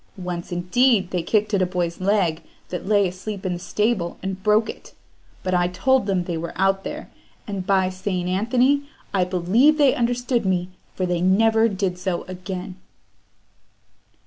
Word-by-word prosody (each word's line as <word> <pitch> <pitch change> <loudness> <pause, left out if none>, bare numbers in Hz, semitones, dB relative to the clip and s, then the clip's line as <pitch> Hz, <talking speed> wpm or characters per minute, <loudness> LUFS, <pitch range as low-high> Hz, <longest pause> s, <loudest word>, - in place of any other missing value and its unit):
Once, 180 -2 -5
indeed, 190 +3 +2
they 180 - 0
kicked 210 +4 0
at 195 - +3
a - - +3
boy's 175 -1 -2
leg 185 -5 +1 0.3
that 180 +1 -5
lay 205 -2 +4
asleep 190 +2 -6
in 185 - 0
the 175 - -5
stable, 210 -1 -1
and 190 0 -4
broke 215 +2 +3
it; - - -9 0.5
but 185 - -1
I 175 -1 +3
told 255 +6 +1
them 190 -3 +1
they 175 -2 -3
were 170 +1 -5
out 195 0 +1
there, - - -7 0.3
and 195 -3 -5
by 190 -2 +3
St. 185 -1 -3
Anthony! 250 +9 +2 0.2
I 185 -2 +2
believe 190 - +3
they 285 -3 +5
understood 245 0 0
me, 180 -2 0 0.3
for 185 - -1
they 175 -1 -1
never 220 +4 +4
did 190 -3 -2
so 180 -2 -2
again." 185 0 -7
190 Hz, 170 wpm, -23 LUFS, 180-215 Hz, 0.5 s, they